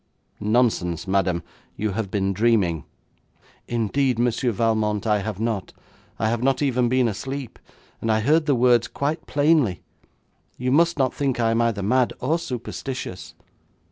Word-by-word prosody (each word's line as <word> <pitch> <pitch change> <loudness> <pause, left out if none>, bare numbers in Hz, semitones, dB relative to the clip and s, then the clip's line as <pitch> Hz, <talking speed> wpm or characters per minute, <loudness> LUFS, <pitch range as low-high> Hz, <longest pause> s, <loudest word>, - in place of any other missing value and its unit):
'Nonsense, 105 -7 +1
madam, 95 -3 +1 0.3
you 105 -1 -2
have 100 0 -3
been 100 -1 0
dreaming.' 95 -7 +1 0.8
'Indeed, 120 +2 0
Monsieur 120 +1 +1
Valmont, 110 -1 0
I 105 -2 +2
have 105 -1 -4
not. 110 -5 -2 0.4
I 110 - 0
have 115 +1 0
not 135 0 +2
even 125 -3 +1
been 130 -1 +3
asleep, 135 +4 -5 0.4
and 115 - 0
I 110 0 +2
heard 155 +6 +2
the 140 - +3
words 120 -1 +4
quite 145 +5 -3
plainly. 145 - +2 0.7
You 125 +1 -1
must 170 +4 +3
not 130 -3 +1
think 135 -4 -1
I 115 -1 +2
am 115 +1 +2
either 115 -4 0
mad 125 +4 +2
or 155 +7 0
superstitious.' 125 - -6
115 Hz, 150 wpm, -23 LUFS, 105-130 Hz, 0.8 s, words